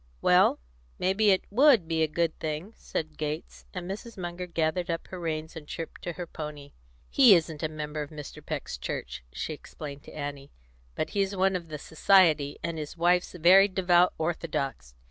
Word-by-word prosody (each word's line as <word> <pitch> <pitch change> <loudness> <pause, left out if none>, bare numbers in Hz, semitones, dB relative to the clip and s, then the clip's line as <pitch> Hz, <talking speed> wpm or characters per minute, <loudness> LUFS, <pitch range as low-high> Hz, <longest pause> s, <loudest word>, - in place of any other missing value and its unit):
"Well, - - +5 0.4
may 185 +1 +1
be 210 +1 +3
it 190 -1 +3
would 245 - +5
be 160 -1 0
a 160 - +4
good 165 +1 0
thing," 160 +7 -4
said 155 -1 -5
Gates, 155 +1 -5
as 180 - -5
Mrs. 205 +5 -7
Munger 180 0 -5
gathered 170 +1 -1
up 165 0 -2
her 185 - -7
reins 160 -2 -3
and 155 -2 -9
chirped 165 +1 -7
to 175 - -4
her 175 +1 -5
pony. 150 -3 -8 0.4
"He 250 -8 +7
isn't 160 -3 -1
a 155 - -1
member 150 0 -5
of 145 - -5
Mr. 150 -2 -9
Peck's - - -5
church," - - -5
she - - -4
explained 145 -2 -9
to - - -11
Annie; 145 -2 -6 0.5
"but - - -2
he's 200 -1 0
one 190 0 +2
of 175 -2 -4
the 155 -1 -6
society, 160 -2 +3
and 165 -1 -3
his 150 +3 -7
wife's 175 +1 +2
very 185 +3 +7
devout 180 -2 +3
Orthodox. 145 - -3
165 Hz, 185 wpm, -28 LUFS, 150-185 Hz, 0.5 s, He